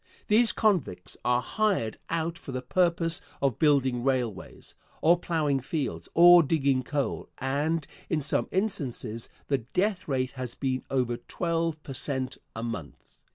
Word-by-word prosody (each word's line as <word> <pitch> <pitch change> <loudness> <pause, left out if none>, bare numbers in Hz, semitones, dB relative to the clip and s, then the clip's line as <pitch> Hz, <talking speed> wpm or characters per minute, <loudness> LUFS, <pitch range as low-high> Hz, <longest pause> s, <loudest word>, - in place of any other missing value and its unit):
These 225 +2 +5
convicts 170 - 0
are 125 0 +2
hired 190 - 0
out 165 0 -1
for 155 - -9
the 130 0 -4
purpose 170 +2 +2 0.2
of 135 -5 0
building 135 -5 +3
railways, 125 -6 -2 0.3
or 170 +2 +4
plowing 155 -6 0
fields, 140 +2 -3
or 175 +1 +9
digging 140 -4 +2
coal, 140 +1 -2
and 145 +4 -1 0.2
in 155 -3 0
some 145 - 0
instances 130 - -2 0.2
the 140 -2 +1
death 185 - -1
rate 130 -3 0
has 130 -3 -6
been 130 -2 -2
over 125 -3 0
twelve 165 -1 -2
per 135 - -7
cent. 130 0 -2 0.2
a 115 - -4
month. 115 -11 -6
140 Hz, 145 wpm, -28 LUFS, 130-165 Hz, 0.3 s, or